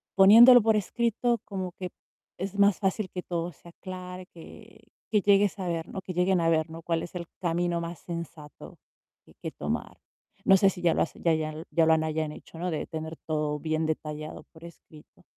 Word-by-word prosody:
poniéndolo 230 +5 +9
por 220 0 +3
escrito, 235 +2 0
como 185 -3 -5
que 180 -1 -6 0.5
es 195 +2 -4
más 200 -2 +4
fácil 195 0 -1
que 180 - -3
todo 175 0 -3
se 170 +3 -16
aclare, 185 0 -8
que 165 - -14 0.3
que 210 -2 +2
llegues 200 +1 +3
a 185 -2 -4
ver, 165 -1 -3
¿no? 190 - -6
Que 185 - -7
lleguen 180 0 +2
a 165 - +2
ver, 160 0 +1
¿no? 165 +1 -9
Cuál 165 0 -1
es 175 - -8
el 170 -2 -5
camino 175 -1 0
más 170 0 -6
sensato 170 -3 -9 0.5
que - - -20
que - - -4
tomar. - - -4 0.5
No 195 - +7
sé 195 0 +5
si 180 -2 -7
ya 170 -2 +3
lo - - 0
has - - -1
ya 165 -1 +1
ya 155 -1 -1
lo 160 +1 -7
ya 165 -1 +3
lo 160 - +5
hayan 155 -1 -2
hecho, 160 - -13
¿no? 180 0 -2
De 155 - -3
tener 160 0 -6
todo 150 -1 -1
bien 155 0 -1
detallado 155 -1 -4
por 160 0 -16
escrito. 155 -2 -16
175 Hz, 205 wpm, -27 LUFS, 160-190 Hz, 0.5 s, poniéndolo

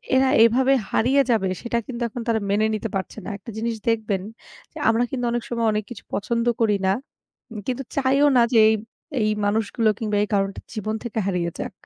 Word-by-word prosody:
এরা 260 0 +4
এভাবে 260 +4 +4 0.2
হারিয়ে 265 +5 +3
যাবে 195 -5 +2
সেটা 235 0 -1
কিন্তু 240 -2 -6
এখন 240 +2 -6
তারা 225 -1 +2
মেনে 210 +2 +2
নিতে 220 +1 -3
পারছে 190 +3 -4
না। - - -4
একটা 210 - -12
জিনিস 230 +1 -1
দেখবেন 215 -4 0 0.5
যে - - -11
আমরা 230 +2 +3
কিন্তু 245 -2 -2
অনেক 240 -1 -1
সময় 235 -2 0
অনেক 210 0 -1
কিছু 230 - -8
পছন্দ 235 +3 -1 0.2
করি 210 -3 +3
না। 190 - +4 0.6
উম 225 - -7
কিন্তু 260 +1 -2
চাইও 275 +2 +3
না 240 - +7
যে 230 - +5
এই, 220 - +4 0.5
এই 215 - +2 0.2
মানুষগুলো 215 +2 +1
কিংবা 210 -2 -1
এই 210 - -1
কারণটা 195 0 0
জীবন 215 0 -3
থেকে 225 -1 -4
হারিয়ে 180 -3 0
যাক। - - -3
225 Hz, 205 wpm, -23 LUFS, 210-240 Hz, 0.6 s, না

